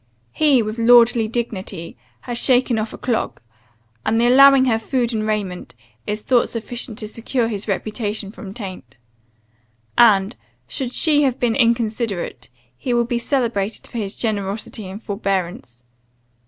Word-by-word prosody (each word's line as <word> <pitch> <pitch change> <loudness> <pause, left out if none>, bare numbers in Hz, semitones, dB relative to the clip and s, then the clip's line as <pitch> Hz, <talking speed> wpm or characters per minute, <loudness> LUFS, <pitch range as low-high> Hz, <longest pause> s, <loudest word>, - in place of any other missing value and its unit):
He, 275 - +3
with 215 +2 -5
lordly 235 -1 +5
dignity, 200 -7 -5 0.3
has 240 -1 -4
shaken 250 -3 +3
of 215 0 -3
a - - -9
clog; 240 -3 -2 0.6
and 225 +1 +1
the 235 - +3
allowing 270 +1 +7
her 225 -3 +2
food 240 +1 -1
and 215 -1 -1
raiment, 200 - -3 0.3
is 210 0 -3
thought 245 -2 +2
sufficient 230 -1 -4
to 215 -3 -4
secure 230 +2 -2
his 210 -2 -4
reputation 210 0 -3
from 205 -3 -9
taint. 185 - -9 1.0
And, 210 -2 +5 0.3
should 260 -4 -3
she 300 -2 +3
have 265 -3 +1
been 235 -2 +1
inconsiderate, 230 - -1 0.3
he 245 - -2
will 235 0 +2
be 240 0 -1
celebrated 230 -5 -1
for 235 - -6
his 200 -2 -3
generosity 210 -1 -3
and 200 +4 -9
forbearance. 185 - -3
225 Hz, 145 wpm, -20 LUFS, 205-240 Hz, 1.0 s, allowing